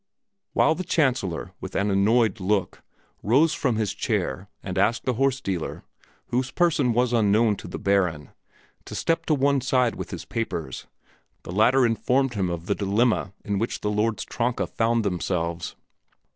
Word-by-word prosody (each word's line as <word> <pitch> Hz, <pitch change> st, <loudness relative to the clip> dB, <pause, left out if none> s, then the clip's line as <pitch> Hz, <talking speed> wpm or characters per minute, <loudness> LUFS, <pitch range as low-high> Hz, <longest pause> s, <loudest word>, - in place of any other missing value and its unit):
While 155 Hz, -, +4 dB
the 185 Hz, -, -4 dB
Chancellor, 125 Hz, -, 0 dB
with 95 Hz, -, -7 dB
an 100 Hz, +1 st, +1 dB
annoyed 105 Hz, +2 st, +3 dB
look, 100 Hz, +1 st, -1 dB, 0.4 s
rose 145 Hz, +9 st, +3 dB
from 125 Hz, -5 st, 0 dB
his 110 Hz, -3 st, -1 dB
chair 95 Hz, +9 st, -2 dB, 0.2 s
and 95 Hz, -2 st, -5 dB
asked 110 Hz, +4 st, +1 dB
the 130 Hz, -, +1 dB
horse 135 Hz, +2 st, +1 dB
dealer, 95 Hz, -10 st, -4 dB, 0.5 s
whose 130 Hz, +2 st, 0 dB
person 150 Hz, -8 st, +2 dB
was 125 Hz, +1 st, +1 dB
unknown 110 Hz, -1 st, +3 dB
to -, -, -9 dB
the -, -, -6 dB
Baron, 90 Hz, -8 st, 0 dB, 0.5 s
to -, -, -8 dB
step 165 Hz, 0 st, 0 dB
to 155 Hz, -, +3 dB
one 140 Hz, 0 st, +2 dB
side 125 Hz, -2 st, +2 dB
with -, -, -6 dB
his -, -, -7 dB
papers, 110 Hz, -8 st, -4 dB, 0.6 s
the -, -, -7 dB
latter 120 Hz, +7 st, +4 dB
informed 125 Hz, +3 st, +1 dB
him 95 Hz, -4 st, -1 dB
of 85 Hz, -1 st, -4 dB
the 100 Hz, -, +1 dB
dilemma 105 Hz, +1 st, +1 dB
in 100 Hz, -1 st, -1 dB
which 115 Hz, -, -2 dB
the 105 Hz, -, -1 dB
lords 105 Hz, +1 st, 0 dB
Tronka 120 Hz, 0 st, -1 dB
found 115 Hz, -1 st, 0 dB
themselves. 85 Hz, -2 st, -2 dB
110 Hz, 165 wpm, -25 LUFS, 100-125 Hz, 0.6 s, While